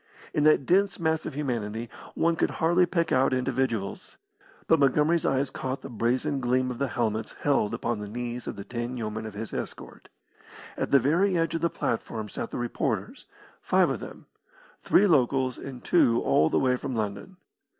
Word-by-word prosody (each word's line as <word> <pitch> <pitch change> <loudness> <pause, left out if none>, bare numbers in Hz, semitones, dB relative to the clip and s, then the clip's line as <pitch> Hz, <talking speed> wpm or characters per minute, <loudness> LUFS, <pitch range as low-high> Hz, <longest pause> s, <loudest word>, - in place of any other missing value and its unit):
In 150 - +1
that 155 -3 +5
dense 195 +4 +2
mass 160 -1 0
of - - -6
humanity, 120 -5 -3 0.3
one 170 0 +2
could - - +1
hardly 175 +2 +3
pick 170 -2 0
out 130 +1 +3
individuals, 130 - -2 0.5
but 160 - +4
Montgomery's 150 +4 +3
eyes 135 0 0
caught 130 0 -4
the - - -7
brazen 125 +6 0
gleam 130 0 +1
of 120 - -7
the 140 - +1
helmets 115 -4 -2
held 115 -7 +2
upon 115 -1 -2
the 105 - -6
knees 120 +2 -5
of - - -4
the 100 - -7
ten 120 +3 -4
yeomen 110 -1 -4
of 105 - -9
his 110 +1 -6
escort. - - -7 0.7
At - - -2
the 140 - +6
very 170 +9 +2
edge 165 0 0
of 165 - -2
the 170 - +2
platform 110 -5 -3
sat 115 - -5
the - - -5
reporters, 120 -1 -3 0.3
five - - +3
of - - -3
them - - -10 0.6
three 200 - +4
locals 130 -6 +2
and 130 -3 -8
two 120 -9 +4
all 80 - +3
the - - +1
way 125 -1 +2
from 130 -1 -4
London. 105 - -4
130 Hz, 185 wpm, -27 LUFS, 115-155 Hz, 0.7 s, the